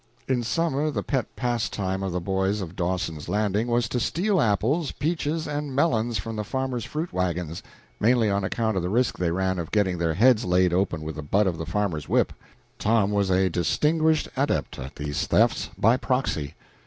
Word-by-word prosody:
In 130 -2 +1
summer 150 +5 0
the 150 - -2
pet 135 -3 -1
pastime 105 -6 -1
of 95 -1 -2
the 90 - -1
boys 95 +3 0
of 90 -2 -6
Dawson's 85 -4 -2
Landing 105 +2 0
was 120 -1 +1
to 125 - -1
steal 185 - +1
apples, 120 - +1
peaches, 160 +1 -2
and 145 -2 -3
melons 120 -6 +2
from 110 +4 -5
the 105 - -1
farmers' 130 -1 -2
fruit 160 +3 -4
wagons, 90 -3 -2 0.4
mainly 115 0 +3
on 100 -1 0
account 110 +2 -1
of 95 - +1
the 90 - -2
risk 120 +5 +1
they 90 -2 +1
ran 95 +1 0
of 85 - -4
getting 95 -5 +1
their 80 -2 0
heads 120 +3 +5
laid 90 -2 +2
open 90 -3 0
with 80 0 -5
the - - -4
butt 100 +8 +2
of 85 -4 -1
the 80 - -4
farmer's 80 -5 -2
whip. - - +2 0.5
Tom 105 -2 +2
was 100 -2 +1
a 95 0 +3
distinguished 155 - +2
adept 130 - -1
at 65 +2 -7
these 75 -1 -3
thefts - - +2
by 115 +4 +4
proxy. 105 - -1
105 Hz, 190 wpm, -25 LUFS, 90-130 Hz, 0.5 s, heads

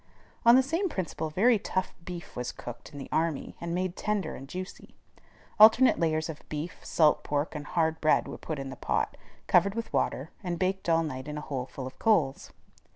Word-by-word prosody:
On 235 - +10
the 260 - +6
same 335 +8 0
principle 160 - -3
very 215 +8 +4
tough 185 -1 -2
beef 175 -1 -8
was 125 0 -3
cooked 120 +3 -9
in 145 - -10
the 135 - -7
army, 160 -3 -1
and 170 0 -2
made 185 0 -1
tender 205 -6 -1
and 135 +1 -10
juicy. 185 +1 -8 0.6
Alternate 225 +4 +7
layers 160 -1 +1
of 160 -2 -7
beef, 155 +3 -5
salt 155 -2 +3
pork, 145 +1 -1
and 150 0 -6
hard 160 -1 0
bread 155 - +3
were - - -7
put 155 - -4
in 135 -1 -5
the - - -7
pot, - - -1 0.3
covered 195 +3 +3
with 230 0 -4
water, 140 +5 -1
and 175 -2 -2
baked 185 0 -1
all 165 0 +4
night 130 -4 -5
in 150 0 -5
a - - -4
hole 135 -4 -4
full 130 - -7
of 130 - -9
coals. 170 -12 +2
165 Hz, 205 wpm, -29 LUFS, 150-190 Hz, 0.6 s, On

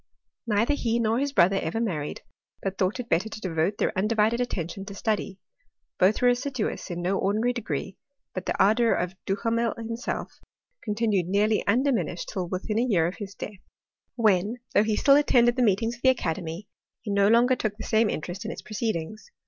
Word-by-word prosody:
Neither 225 +5 +2
he 235 -5 0
nor 230 0 +1
his 280 +1 -1
brother 195 -4 +4
ever 165 +8 -2
married, 165 -10 -3 0.4
but 195 0 -3
thought 185 +5 0
it 245 - -4
better 190 +2 +1
to 215 - -7
devote 185 +1 -1
their - - 0
undivided 215 +4 +2
attention 195 -5 -3
to 200 -1 -8
study. 205 -2 -2 0.6
Both 195 +6 +3
were 245 - +6
assiduous 245 -3 -2
in 175 0 -4
no 190 +2 0
ordinary 215 +5 +1
degree, 195 - -4 0.4
but 185 - -5
the - - -1
ardour 225 +3 +4
of 180 +1 -2
Duhamel 230 +3 0
himself 230 +2 -5 0.4
continued 210 -4 0
nearly 210 +3 +2
undi 255 +7 +3
minished 180 - -2
till 185 -4 -2
within 200 +5 -2
a 245 - +1
year 175 -9 +3
of 175 - -3
his 205 -3 -7
death; 205 -2 -7 0.6
when, 215 -1 +2 0.2
though - - +5
he 215 0 +1
still 275 +5 +5
attended 240 -5 +4
the 255 - 0
meetings 225 +1 +1
of - - -26
the 260 - +5
academy, 180 -5 -2 0.3
he 210 - -5
no 200 0 +4
longer 240 +4 +5
took 215 -3 -3
the - - -7
same 220 -1 +2
interest 175 +6 -4
in 220 - -4
its - - -7
proceedings. 215 - -4
215 Hz, 190 wpm, -26 LUFS, 190-235 Hz, 0.6 s, were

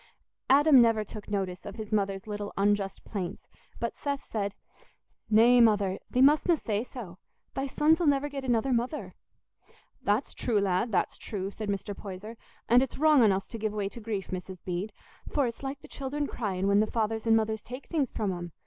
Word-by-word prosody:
Adam 280 0 +7
never 225 -2 +3
took 210 0 -10
notice 190 -3 -2
of 205 - -8
his 220 -1 -7
mother's 195 -2 0
little 205 -1 -5
unjust 200 -1 +1
plaints; 190 -3 -5 0.3
but 235 - -2
Seth 280 -1 -3
said, 200 -2 -3 0.7
"Nay, 235 +3 +6
Mother, 205 -4 +3
thee 255 - +3
mustna 310 +4 +5
say 215 -5 -2
so. 225 -9 -9 0.3
Thy 270 +1 -2
sons 310 +5 +3
'ull 335 - +2
never 285 0 +3
get 280 -2 -6
another 250 +1 +1
mother." 245 +6 -2 0.9
"That's 210 +6 0
true, 225 -4 0
lad, 200 +3 +1
that's 185 - 0
true," 195 -2 -4
said 215 0 -5
Mr. 200 0 -3
Poyser; 200 +3 -8 0.3
"and 245 +1 +6
it's 265 - -3
wrong 305 -2 +5
on 215 -3 +6
us 190 0 -1
to 230 - -6
give 215 -1 -1
way 205 -2 -2
to 235 - -10
grief, 210 -3 -4
Mrs. 185 -1 -6
Bede; 185 +4 -3 0.4
for 285 -3 +1
it's 235 -1 -5
like 275 +1 -5
the - - -12
children 290 +2 -3
cryin' 195 -8 -2
when 200 0 +4
the 215 - +3
fathers 225 0 -1
and 225 0 +6
mothers 220 -1 -1
take 255 +3 -9
things 295 -7 0
from 205 -4 -2
'em. 175 -2 -7
220 Hz, 195 wpm, -29 LUFS, 200-255 Hz, 0.9 s, Adam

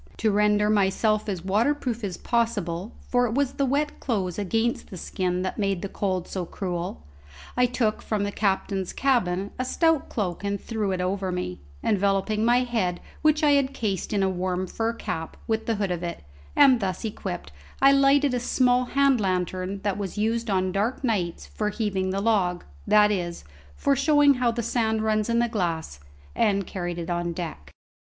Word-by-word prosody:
To 220 - +2
render 210 0 +3
myself 210 +1 +2
as 185 -3 -4
waterproof 235 +3 0
as 190 -4 -3
possible 220 -5 -1
for 245 0 +2
it 225 - -3
was 280 -1 +1
the 275 - 0
wet 290 +3 0
clothes 195 -7 -2
against 225 +4 -1
the 185 - -8
skin 180 +1 -2
that 185 - -3
made 195 -3 0
the - - -1
cold 185 -3 -2
so 185 - -3
cruel 175 - -4 0.5
I 250 0 +4
took 230 -3 0
from 210 -2 -1
the 205 - -1
captain's 195 -2 -1
cabin 200 -8 +1
a - - +1
stout 325 +3 +1
cloak 190 -4 -3
and 200 0 -1
threw 215 -4 -2
it 185 -1 -1
over 190 +1 -1
me, 135 - -4 0.2
enveloping 200 +1 +1
my 240 +2 +4
head, 210 -8 -1 0.2
which 305 0 +3
I 295 - +5
had 275 -1 +2
cased 200 -7 -2
in 200 -2 +1
a - - +3
warm 185 0 -1
fur 225 +5 -2
cap, 180 -8 -5
with 220 0 -1
the 230 - +1
hood 200 -2 -1
of 175 -1 -2
it; 170 - -5 0.3
and 270 -4 +6
thus 190 0 -2
equipped 185 - -5 0.3
I 275 0 +7
lighted 275 0 +4
a 250 - +1
small 250 0 +2
hand 275 -1 +3
lantern 185 0 -1
that 205 -1 -1
was 200 0 -4
used 225 +2 0
on 185 -1 +1
dark 210 +8 -1
nights 190 -9 -1
for 210 -1 -2
heaving 200 -4 -1
the 195 +1 -1
log, 195 -5 +1 0.2
that 210 0 +5
is, 175 -4 -3 0.3
for 280 - +2
showing 290 +1 +5
how 250 -2 +1
the 235 0 -2
sand 220 -1 0
runs 215 0 +1
in 235 - +2
the 240 0 +3
glass, 170 - -2 0.4
and 200 -3 +2
carried 175 -2 -4
it 170 0 -4
on 175 0 -1
deck. 160 - -6
205 Hz, 190 wpm, -25 LUFS, 185-235 Hz, 0.5 s, I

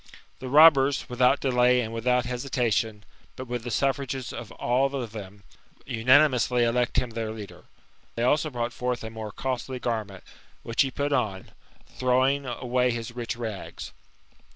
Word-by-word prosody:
The 130 - -6
robbers, 145 -1 +6
without 125 +2 +3
delay, 125 -1 +3
and 115 -1 -5
without 125 +2 +1
hesitation, 120 -4 -1 0.3
but 130 - -7
with 120 -1 -4
the 120 - -5
suffrages 135 +1 -1
of 115 - -8
all 135 +3 0
of 120 -5 -4
them, 100 -2 -10 0.4
unanimously 125 0 +3
elect 120 +2 +1
him 125 -2 0
their 115 -1 -3
l«uler. 110 -2 -9 0.5
They 115 - -1
also 150 +5 +2
brought 120 -2 -3
forth 125 -1 -3
a 110 - -6
more 110 -1 -7
costly 130 +1 -4
garment, 110 -6 -4 0.4
which 115 0 +1
he 135 - +2
put 145 +2 -2
on, 95 -8 -2 0.3
throwing 130 +2 +1
away 125 +1 0
his 115 -1 -4
rich 120 -2 -4
rags. 110 -5 -6
125 Hz, 155 wpm, -26 LUFS, 115-130 Hz, 0.5 s, robbers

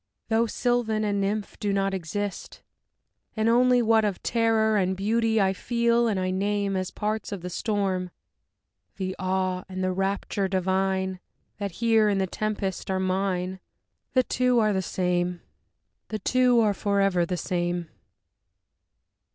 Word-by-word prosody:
Though 225 +1 +2
Sylvan 230 -2 0
and 205 -1 0
Nymph 205 +1 -2
do 205 - -1
not 195 0 0
Exist, 195 +3 -4 0.7
and 220 +1 +1
only 245 +1 +4
what 225 -1 +4
Of 205 -4 -2
terror 225 -2 +2
and 190 -2 +1
beauty 225 +2 +1
I 190 -1 +3
feel 235 +2 +1
and 205 -4 0
I 185 0 -1
name 200 +1 0
As 185 -1 -1
parts 215 0 -3
of 200 -3 -5
the 180 - -5
storm, 190 -3 -1 0.9
the 190 -1 -3
awe 185 -1 -1
and 185 0 -4
the 185 - +1
rapture 195 +1 -1
divine 190 0 0 0.4
That 200 -3 -3
here 225 0 +3
in 200 - +1
the 190 - +1
tempest 200 -1 -3
are 190 0 0
mine, 185 0 -1 0.5
The 255 - +4
two 250 0 +1
are 215 -2 +3
the 190 - 0
same, 180 -1 -1 0.7
the 215 - -3
two 250 +3 +3
are 210 -2 +3
forever 195 -3 +1
the 180 +1 -2
same. 175 -1 -2
200 Hz, 150 wpm, -26 LUFS, 185-220 Hz, 0.9 s, only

